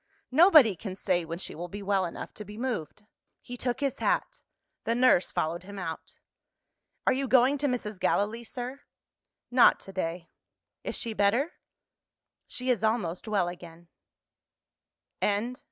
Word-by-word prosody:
Nobody 305 - +7
can 190 +1 -6
say 180 -3 0
when 165 +1 -5
she 185 - -6
will 175 +3 -6
be 200 +3 -7
well 195 -1 +1
enough 170 - -7
to 210 - -8
be 210 +1 -10
moved." 215 - -4 0.3
He 245 - -9
took 245 +2 -2
his 275 -2 -1
hat. - - 0 0.4
The 230 - 0
nurse 245 -7 +4
followed 165 +3 -2
him 200 +2 -10
out. 165 -4 -6 0.9
"Are - - +4
you 270 +1 -1
going 260 +3 +4
to 290 - +1
Mrs. 215 -6 -3
Gallilee, 215 +6 +1
sir?" 250 +4 -6 0.7
"Not 245 0 +6
to 195 - -11
day." 170 -2 -3 0.6
"Is - - -3
she 230 - -2
better?" 220 +10 +2 1.0
"She 255 0 -1
is 230 -3 0
almost 215 -5 0
well 200 -5 +1
again." 170 -1 -10 1.3
CHAPTER 205 0 +2
LIII. - - -7
210 Hz, 155 wpm, -28 LUFS, 180-250 Hz, 1.3 s, Nobody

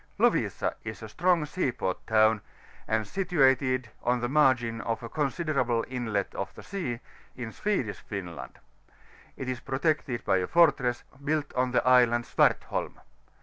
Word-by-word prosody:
XiOlTIS - - +2
A - - +1
is 110 0 -7
a 110 - -7
strong 175 - +2
sea 150 -2 -1
port 95 -6 -4
town, 110 -1 +4 0.5
and 110 0 +1
situated 130 - +2
on 125 +1 +1
the 120 - -1
margin 125 -5 +2
of 115 +1 -3
a 115 - -6
considerable 140 -6 0
inlet 115 -6 -2
of 95 0 -4
the - - -11
sea, 145 -12 -4 0.3
in 120 -3 -6
Swedish 125 - -2
Finland: 90 -6 -7 0.8
it 130 - -5
is 130 -1 -2
protected 135 -1 -1
by 95 - +3
a 90 - -1
fortress, 135 -8 +3 0.2
built 150 0 -1
on 125 0 +1
the 125 - +1
Island 120 -2 +5
Swartholm. - - +1
125 Hz, 150 wpm, -28 LUFS, 115-145 Hz, 0.8 s, Island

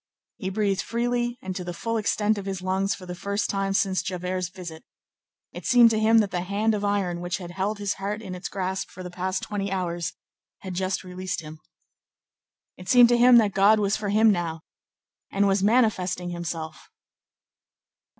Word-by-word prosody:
He 190 -5 -3
breathed 195 -1 0
freely 240 +1 -1
and 185 -1 -4
to 180 - -4
the 175 0 -6
full 230 +6 -3
extent 215 0 +1
of 200 - -7
his 190 -2 -4
lungs 190 +1 0
for 185 - -11
the 180 - -6
first 200 +3 -2
time 195 -1 -1
since 195 -2 +1
Javert's 180 0 -3
visit. 175 -4 -9 0.7
It - - -7
seemed 240 -2 +7
to 220 - +1
him 220 +1 +4
that 200 -2 -2
the 180 - -1
hand 205 +4 0
of 205 -1 -2
iron 195 -4 0
which 175 +1 -2
had 175 -2 -8
held 195 +4 -2
his 205 -1 -1
heart 205 +2 -2
in 195 -4 -7
its 180 +1 -6
grasp 190 -1 -3
for 185 - -10
the 180 0 -8
last 185 +1 -2
twenty 200 -1 -3
hours 175 -2 -2 0.5
had 190 -1 -6
just 190 +1 -2
released 185 0 -4
him. 155 0 -10 1.2
It 180 0 -10
seemed 245 -2 +7
to 240 - +4
him 245 0 +8
that 210 -4 +3
God 200 +3 +5
was 205 0 +1
for 205 -1 -3
him 215 +2 +5
now, 170 -4 -2 0.7
and 200 +1 +2
was 195 0 +2
manifesting 190 -5 +1
Himself. 160 -3 -6
195 Hz, 190 wpm, -25 LUFS, 180-210 Hz, 1.2 s, him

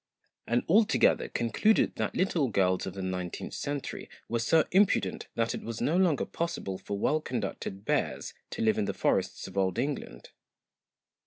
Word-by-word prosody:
and 120 +1 +1
all 210 +7 +6
together 220 - +2
concluded 120 - +2
that - - -2
little 175 -6 +1
girls 95 -5 +1
of 95 - -6
the 95 - -4
nineteenth 90 -1 -4
century 145 -1 -4 0.2
were 115 - -1
so 155 +7 +3
impudent 195 +2 +2
that 115 0 0
it - - -5
was 115 -1 -5
no 160 - +1
longer 175 -6 +3
possible 100 - -3
for 100 - -4
well 155 +9 +1
conducted 105 -5 -4
bears - - -1 0.2
to - - -3
live 110 -1 +3
in - - +1
the - - -3
forests - - 0
of 95 +1 -3
Old 95 -2 +1
England. 130 - -4
115 Hz, 170 wpm, -29 LUFS, 95-155 Hz, 0.2 s, all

